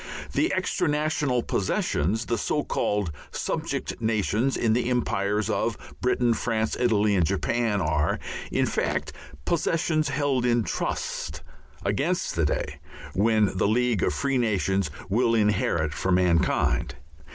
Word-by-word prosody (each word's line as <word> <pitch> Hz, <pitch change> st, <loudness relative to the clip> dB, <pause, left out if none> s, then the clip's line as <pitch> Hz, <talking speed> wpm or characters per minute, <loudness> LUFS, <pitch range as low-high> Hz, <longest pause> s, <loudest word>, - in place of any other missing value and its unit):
The -, -, +2 dB
extra -, -, 0 dB
national 150 Hz, -4 st, +1 dB
"possessions," 100 Hz, +2 st, 0 dB
the 120 Hz, -2 st, -1 dB
so 150 Hz, +6 st, 0 dB
called 105 Hz, -5 st, -1 dB, 0.2 s
"subject -, -, -3 dB
nations" 110 Hz, +3 st, +1 dB
in 115 Hz, -2 st, +2 dB
the 120 Hz, +1 st, +1 dB
Empires 105 Hz, -4 st, 0 dB
of 110 Hz, 0 st, 0 dB, 0.2 s
Britain, 125 Hz, -1 st, +2 dB
France, 110 Hz, -1 st, -1 dB
Italy, 105 Hz, -4 st, +3 dB
and 90 Hz, -, +3 dB
Japan, 105 Hz, +5 st, 0 dB
are, 80 Hz, -1 st, +1 dB, 0.3 s
in -, -, +2 dB
fact, -, -, -1 dB, 0.3 s
possessions 160 Hz, -2 st, +1 dB
held 140 Hz, -2 st, 0 dB
in 120 Hz, -1 st, +2 dB
trust 75 Hz, -5 st, -3 dB, 0.4 s
against 145 Hz, -, 0 dB
the 85 Hz, -2 st, +2 dB
day 70 Hz, 0 st, -2 dB, 0.3 s
when 105 Hz, 0 st, +2 dB
the 95 Hz, -, +2 dB
League 120 Hz, -1 st, +2 dB
of -, -, +2 dB
Free 135 Hz, -2 st, 0 dB
Nations 95 Hz, -6 st, +1 dB, 0.2 s
will 115 Hz, +4 st, +2 dB
inherit 105 Hz, -7 st, +1 dB
for 95 Hz, -, -1 dB
mankind. 90 Hz, -2 st, +2 dB
110 Hz, 130 wpm, -26 LUFS, 100-125 Hz, 0.4 s, Italy